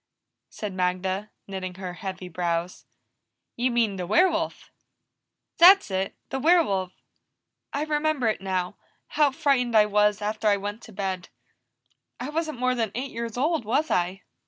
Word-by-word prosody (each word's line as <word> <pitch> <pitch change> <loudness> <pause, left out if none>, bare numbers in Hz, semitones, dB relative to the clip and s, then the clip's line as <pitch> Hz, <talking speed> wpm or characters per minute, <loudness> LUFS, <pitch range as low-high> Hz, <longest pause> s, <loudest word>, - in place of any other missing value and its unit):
said 210 -3 -6
Magda, 185 +2 -1 0.2
knitting 185 -2 -5
her 185 -1 -6
heavy 185 0 -6
brows. 170 0 -3 0.7
"You 245 +2 +1
mean 230 -5 +1
the 180 -1 -4
werewolf." 355 - +1 0.9
"That's 365 - +8
it! 190 +1 -2 0.2
The 265 - -1
werewolf. 250 - +3 0.8
I 285 - -1
remember 305 -3 0
it 215 - 0
now 185 -2 -2 0.3
how 300 -2 +3
frightened 265 -4 +1
I 210 - +7
was 210 0 +2
after 215 +1 -2
I 205 -1 +4
went 205 +3 -5
to 225 - -13
bed. 190 -3 -4 0.9
I 250 +3 -4
wasn't 310 -2 -2
more 255 +1 +1
than 225 -4 -1
eight 260 +3 -3
years 230 0 -5
old, 310 +1 +1
was 275 +9 0
I?" 180 +2 0
210 Hz, 150 wpm, -26 LUFS, 190-265 Hz, 0.9 s, That's